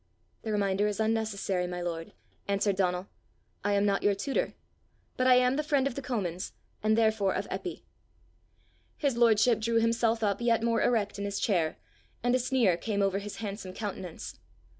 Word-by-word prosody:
"The 220 - -4
reminder 200 0 +1
is 210 -1 -3
unnecessary, 215 -5 0
my 180 0 -4
lord," 165 -2 -4 0.3
answered 200 0 +1
Donal. 180 -1 0 0.6
"I 205 +1 +1
am 200 0 +3
not 200 -1 +2
your 205 -1 +3
tutor, 260 +8 -1 0.6
but 255 - +1
I 255 - +7
am 250 +1 +3
the 305 - 0
friend 285 -3 +2
of 275 - -1
the 275 - -5
Comins, 190 -9 -3 0.3
and 215 +1 +2
therefore 220 -4 +2
of - - -2
Eppy." - - -5 1.1
His 280 -5 0
lordship 230 0 +4
drew 230 +1 -1
himself 230 0 +1
up 205 +1 0
yet 235 -1 +2
more 230 -1 +2
erect 205 -4 +1
in 200 - -2
his 200 0 -2
chair, 170 -7 +1 0.5
and 245 0 +2
a 255 - +3
sneer 245 -8 +2
came 200 +1 -1
over 195 0 +1
his 205 0 -7
handsome 200 -3 -6
countenance. 190 -5 -6
210 Hz, 180 wpm, -29 LUFS, 195-230 Hz, 1.1 s, I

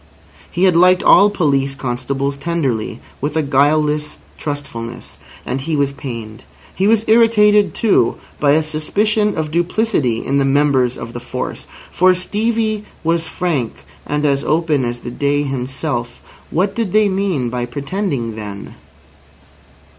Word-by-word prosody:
He 180 - -1
had 185 -3 +5
liked 180 +2 +5
all 205 - +7
police 140 -8 0
constables 135 +2 -2
tenderly, 140 -8 -2 0.2
with 145 +3 -2
a 160 - +2
guileless 150 +2 +1 0.2
trustfulness. 125 -5 -6 0.3
And 130 - -3
he 155 +3 -2
was 140 -1 +1
pained. 115 -6 -7 0.3
He 195 - +1
was 220 0 +3
irritated, 210 -2 +4
too, 200 - +2 0.2
by 145 -1 +4
a 155 +1 +3
suspicion 210 +8 0
of 155 -1 -2
duplicity 170 - 0
in 140 +1 +1
the - - +3
members 135 -3 +2
of 115 - -7
the 120 - -5
force. 125 +1 -5 0.2
For 185 +1 +4
Stevie 215 +3 -1 0.2
was 165 0 0
frank 160 -8 -2 0.3
and 150 +1 -1
as 140 -1 +1
open 155 -4 +1
as 120 0 -4
the 120 - -6
day 145 +3 0
himself. 130 -2 -3 0.3
What 195 +4 0
did 220 -4 -2
they 215 -1 +4
mean 190 -10 -1
by 120 0 -2
pretending 140 - -3
then? 105 -2 -8
150 Hz, 145 wpm, -18 LUFS, 130-185 Hz, 0.3 s, all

